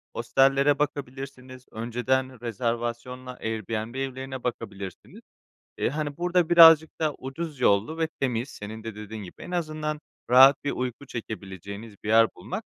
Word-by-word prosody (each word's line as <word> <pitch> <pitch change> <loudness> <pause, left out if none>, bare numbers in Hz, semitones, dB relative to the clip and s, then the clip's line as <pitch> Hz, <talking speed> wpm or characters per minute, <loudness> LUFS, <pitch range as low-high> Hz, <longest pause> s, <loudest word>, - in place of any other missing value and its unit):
hostellere 135 +1 +3
bakabilirsiniz, 130 -3 -5
önceden 125 +2 -1
rezervasyonla 120 +2 -3
Airbnb 110 +1 -4
evlerine 130 -1 -4
bakabilirsiniz. 100 -6 -6 0.6
Eee, - - +1
hani, 145 0 -3
burada 175 0 +1
birazcık 165 -2 +8
da 155 -2 +1
ucuz 140 +1 -6
yollu 110 +9 +2
ve 160 -1 +1
temiz 125 -1 -1
senin 110 0 -8
de 110 -2 -5
dediğin 105 0 -7
gibi 90 - -11
en - - -8
azından 155 -3 -2 0.3
rahat 135 +3 +7
bir 145 - 0
uyku 125 +2 -4
çekebileceğiniz 100 -2 -7
bir 105 - -4
yer 115 0 +6
bulmak, - - -6
130 Hz, 135 wpm, -26 LUFS, 115-145 Hz, 0.6 s, birazcık